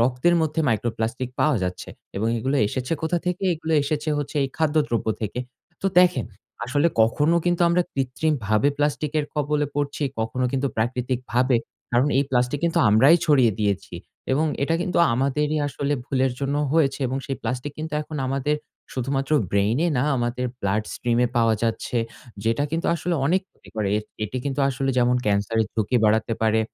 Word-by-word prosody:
রক্তের 125 +8 +2
মধ্যে 160 0 0
micro 115 0 +1
plastic 120 +3 -2
পাওয়া 150 -3 +3
যাচ্ছে 90 0 -4 0.3
এবং 110 +3 0
এগুলো 135 +5 0
এসেছে 130 +5 -3
কোথা 160 +2 +1
থেকে? 180 +1 -1
এগুলো 160 0 -4
এসেছে 150 +2 -2 0.3
এই 135 - -1
খাদ্যদ্রব্য 150 -7 +1 0.2
থেকে। 105 +3 -3 0.4
তো - - +1
দেখেন, 180 0 +3 0.4
আসলে 145 +7 +2
কখনো 150 +9 +2
কিন্তু 175 0 +2
আমরা 175 +1 +3
কৃত্রিমভাবে 130 -3 +1
প্লাস্টিকের 150 +1 0
কবলে 150 0 0
পড়ছি, 145 +1 -2 0.2
কখনো 120 +3 -1
কিন্তু 135 +1 0
প্রাকৃতিকভাবে। 125 +2 0 0.4
কারণ 125 +4 +3
এই 140 - +3
প্লাস্টিক 125 +2 +1
কিন্তু 170 - +1
আমরাই 130 +10 +6
ছড়িয়ে 130 -7 +4
দিয়েছি 100 -3 -1 0.4
এবং 150 +4 +2 0.2
এটা 165 +4 +1
কিন্তু 175 -1 -1 0.2
আমাদেরই 145 +4 0
আসলে 140 0 -2
ভুলের 130 -1 0
জন্য 140 +1 -1 0.2
হয়েছে 145 -4 +2
এবং 130 +2 -2
সেই 135 - -3
প্লাস্টিক 125 +5 -3
কিন্তু 155 0 -5
এখন 150 0 -7
আমাদের 135 +3 0 0.4
শুধুমাত্র 135 +2 -2 0.2
ব্রেইন 100 +6 +2 0.2
না, - - +2
আমাদের 120 +1 -1 0.2
blood 100 +2 0
stream 120 -1 0
এ - - +3
পাওয়া 115 -1 +4
যাচ্ছে। 115 +1 -1 0.5
যেটা 115 +5 +1
কিন্তু 165 +1 -1
আসলে 170 +1 -2
অনেক 180 +6 +3
ক্ষতি - - -21
করে। 105 -2 0
এট 105 - -6 0.2
এটি 110 +4 -5
কিন্তু 140 0 -1
আসলে 135 0 -1
যেমন 125 0 +3
ক্যান্সারের 105 +2 +1
ঝুঁকি 110 +3 +1
বাড়াতে 110 +2 +2
পারে 110 0 +3
130 Hz, 165 wpm, -24 LUFS, 115-150 Hz, 0.5 s, আমরাই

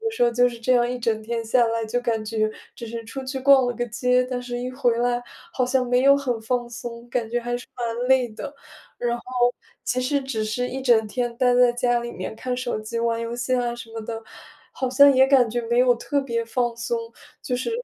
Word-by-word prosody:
后 455 - -3
有 - - -2
时 - - -1
候 240 - +5
就 245 +1 +3
是 235 - -9
这 255 +3 +2
样 240 -1 +3
一 250 - -2
整 225 -2 0
天 230 +1 -3
下 235 +1 +3
来， 230 0 -1
就 245 +3 -1
感 230 -3 -1
觉 215 0 0 0.3
只 235 - -7
是 230 0 -6
出 265 +5 -6
去 265 0 -4
逛 270 -1 +6
了 245 - -1
个 240 - -2
街， 250 +2 +2
但 250 -1 -2
是 245 -1 -5
一 250 +1 -3
回 255 -3 +1
来， 245 0 +1 0.3
好 255 -5 0
像 255 0 +1
没 250 +1 +2
有 275 +1 +7
很 250 -5 -2
放 240 +1 -2
松， 235 0 -8
感 235 -2 -1
觉 240 - 0
还 240 +1 -2
是 245 - -10
蛮 240 0 -2
累 260 -2 +4
的。 280 +7 -8 0.4
然 240 0 -1
后 - - -13 0.6
其 250 +2 0
实 275 +3 +1
只 240 -5 -2
是 230 +4 -1
一 265 - -5
整 235 -4 +3
天 240 +2 -3
待 250 0 +3
在 245 -1 +6
家 245 0 +1
里 235 0 -5
面 185 +1 -6
看 250 +2 -3
手 245 -3 -2
机、 215 +2 -4
玩 230 0 0
游 230 +1 -4
戏 250 +1 0
啊 240 -1 0
什 230 -1 -10
么 225 - -5
的， 225 +1 -5 0.5
好 260 - -2
像 280 +2 +7
也 265 +1 +6
感 265 -4 +5
觉 240 +2 -1
没 235 - +2
有 250 0 +5
特 280 +4 -1
别 235 -3 -2
放 240 +1 -1
松。 235 0 -4 0.3
就 250 - -2
是， 255 - -2
240 Hz, 270 characters per minute, -24 LUFS, 230-255 Hz, 0.6 s, 有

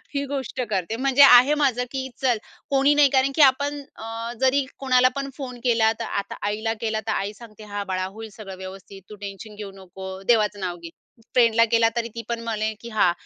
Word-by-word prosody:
ही 280 - 0
गोष्ट 270 -2 -4
करते. 195 +2 -1
म्हणजे 270 +1 +3
आहे 255 +2 +8
माझं, 260 -4 +1
की 265 -1 -4
चल 250 -3 +2 0.3
कोणी 275 +1 +4
नाही 290 -2 +6
कारण 265 0 +2
की 315 - +3
आपण 285 +1 +3 0.2
अ, 225 +1 -6
जरी 265 +1 +3
कोणाला 255 -1 +4
पण 275 0 -3
फोन 250 -3 -7
केला 230 -2 +3
तर 230 - -3
आता 200 - -4
आईला 220 +2 -1
केला, 220 -1 -1
तर - - +1
आई 200 +1 -2
सांगते 215 -1 -14
"हां 205 0 -3
बाळा 185 0 -1
होईल 220 +4 -8
सगळं 195 -4 -9
व्यवस्थित, 190 +1 -10
तू 210 - -9
टेन्शन 205 +2 -9
घेऊ 205 -1 -7
नको, 190 +1 -10 0.2
देवाचं 210 -3 +3
नाव 180 -2 -3
घे". 170 - -7 0.4
फ्रेंडला 230 -2 +5
केला, 230 0 +3
तरी 235 -1 -1
ती 230 - -4
पण 235 -1 -2
म्हणे 220 -1 -2
की 235 - -8
"हां, 210 -6 +3
230 Hz, 210 wpm, -23 LUFS, 210-265 Hz, 0.4 s, आहे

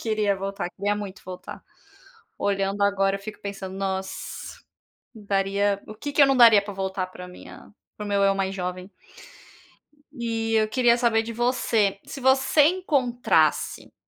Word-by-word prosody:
queria 215 -3 0
voltar, 195 -1 -4
queria 205 +3 -2
muito 200 -2 -7
voltar. 185 -1 -9 0.8
Olhando 195 0 -1
agora, 195 -1 +2
eu - - -15
fico 210 +1 -9
pensando: 195 -2 -6
"Nossa, 190 -1 -5 0.5
daria 200 -1 0
o - - -8
que 285 +6 -6
que 290 - +4
eu 280 - +8
não 270 -1 +2
daria 230 -4 +8
para 205 - -7
voltar 190 -1 -3
para 180 0 -10
minha 180 +3 -13 0.2
para 210 - -6
o - - -5
meu 200 -1 +2
eu 195 0 +4
mais 195 0 -2
jovem?". 180 +1 -5 1.2
E 225 -4 -2
eu 215 -1 +3
queria 235 +1 +3
saber 235 -2 +2
de 230 +1 -6
você, 230 -4 +1
se 275 - -8
você 265 +3 +4
encontrasse 285 -8 +1
205 Hz, 160 wpm, -24 LUFS, 195-235 Hz, 1.2 s, eu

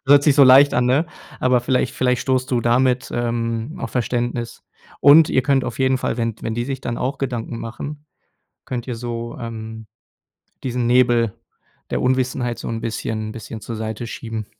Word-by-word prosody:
Hört 140 0 +7
sich 145 -3 +5
so 140 - +8
leicht 135 +2 +7
an, 125 0 +2
ne? 140 +7 +2 0.3
Aber 125 -1 +3
vielleicht 125 0 0
vielleicht 125 -1 +1
stoßt 130 -1 0
du 125 -2 +2
damit, 125 +2 +2
ähm, 115 +2 -2
auf 115 - -5
Verständnis. 120 -1 -2 0.4
Und 150 +3 +7
ihr 130 - +2
könnt 135 -1 +2
auf - - -5
jeden 130 0 +2
Fall, 125 - -2
wenn 115 -2 -1
d - - -22
wenn 110 - -2
die 120 0 -2
sich 135 0 -4
dann 120 -1 -4
auch 135 +2 -2
Gedanken 120 -3 -3
machen, 145 +6 -7 0.6
könnt 125 -1 -4
ihr 125 - -3
so, 120 0 -5
ähm, 110 -1 -7 0.8
diesen 125 -1 -1
Nebel 120 -3 +3 0.6
der - - -1
Unwissenheit 125 -1 0
so - - -6
'n 115 -1 -3
bisschen 110 -1 -3
bisschen 110 -1 -8
zur 115 - -6
Seite 110 +1 -4
schieben. 110 -2 -6
120 Hz, 185 wpm, -21 LUFS, 115-130 Hz, 0.8 s, so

